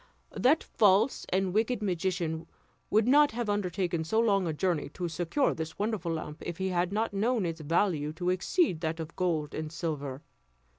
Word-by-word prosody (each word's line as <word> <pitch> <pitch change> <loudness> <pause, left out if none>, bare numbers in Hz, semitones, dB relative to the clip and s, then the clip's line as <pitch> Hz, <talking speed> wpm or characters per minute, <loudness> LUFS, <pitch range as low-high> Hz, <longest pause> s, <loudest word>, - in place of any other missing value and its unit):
That 290 +6 +3
false 210 +4 +3
and 190 -1 0
wicked 220 +2 +1
magician 175 -3 -1 0.4
would 215 +2 +3
not 290 0 +5
have 230 -2 -1
undertaken 180 -4 -1
so 195 +8 +1
long 200 -5 +3
a - - 0
journey 155 -1 -1
to 180 - -2
secure 175 - 0
this 160 0 -6
wonderful 205 -5 -1
lamp 155 -1 -6
if 175 -1 -5
he 190 0 -1
had 180 0 0
not 215 +1 -1
known 220 +1 +1
its 165 -1 -4
value 155 -1 +1
to 180 +2 -1
exceed 185 - +1
that 160 0 -2
of 160 0 -6
gold 160 -5 -1
and 155 0 -4
silver. 150 -5 -4
180 Hz, 180 wpm, -29 LUFS, 160-210 Hz, 0.4 s, not